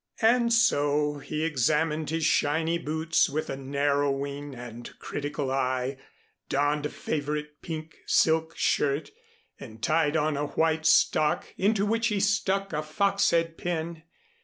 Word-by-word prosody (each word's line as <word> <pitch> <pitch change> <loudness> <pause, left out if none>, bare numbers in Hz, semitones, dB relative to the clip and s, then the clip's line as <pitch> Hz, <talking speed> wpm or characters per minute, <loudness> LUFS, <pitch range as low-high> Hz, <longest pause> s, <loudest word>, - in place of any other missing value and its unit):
And 235 +1 +4
so, 150 -10 +2
he 155 +2 -4
examined 155 +1 +1
his 160 0 -1
shiny 160 +3 +1
boots 160 +1 +1
with 155 +3 -3
a - - -3
narrowing 140 0 -1
and 120 -1 -9
critical 145 -2 -4
eye, 130 0 -1 0.5
donned 145 +1 +1
a - - -10
favorite 150 0 -4
pink 160 -1 -7
silk 160 0 +2
shirt 140 +1 0 0.5
and 110 -4 -11
tied 155 -1 +2
on 150 -1 0
a 145 +1 -1
white 160 0 +1
stock 150 -1 +3
into 200 +1 +1
which 225 +2 +1
he 210 -3 0
stuck 195 -1 0
a 150 - 0
fox 195 +6 +1
head 165 -1 0
pin. 170 -1 -3
155 Hz, 135 wpm, -27 LUFS, 145-165 Hz, 0.5 s, And